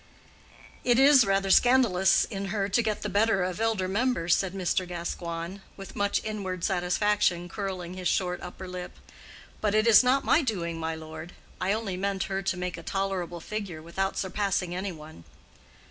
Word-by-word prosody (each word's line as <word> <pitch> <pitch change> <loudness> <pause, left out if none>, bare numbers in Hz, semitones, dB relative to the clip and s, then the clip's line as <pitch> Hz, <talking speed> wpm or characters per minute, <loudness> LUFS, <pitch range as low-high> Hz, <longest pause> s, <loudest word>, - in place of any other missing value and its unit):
"It 245 -1 +3
is 270 -2 +7
rather 195 0 +1
scandalous 230 -8 +4
in 200 -2 -5
her 195 0 -1
to 200 +4 +2
get 215 -2 -2
the - - -1
better 205 -2 +2
of 185 +3 -3
elder 220 -5 +1
members," 195 -4 +1
said 190 -1 0
Mr. 185 0 0
Gascoigne, 170 +1 -5 0.2
with 195 -1 -10
much 205 0 +1
inward 190 -5 -4
satisfaction 180 -1 +1
curling 185 -2 -5
his 185 -1 -3
short 180 -1 0
upper 185 +1 -8
lip. 180 0 -7 0.6
"But 210 -1 +1
it 215 +1 +3
is 230 0 +7
not 260 +2 +2
my 320 - +4
doing, 170 - -2
my 160 0 -2
lord. 160 +2 -9 0.3
I 185 - +1
only 205 -3 -2
meant 195 0 -1
her 195 0 -3
to 190 -1 -2
make 180 -1 -4
a - - -8
tolerable 185 -2 -3
figure, 200 -5 -5
without 190 +4 -2
surpassing 190 -2 -1
any 190 +2 -3
one." 155 - -12
190 Hz, 175 wpm, -27 LUFS, 180-210 Hz, 0.6 s, is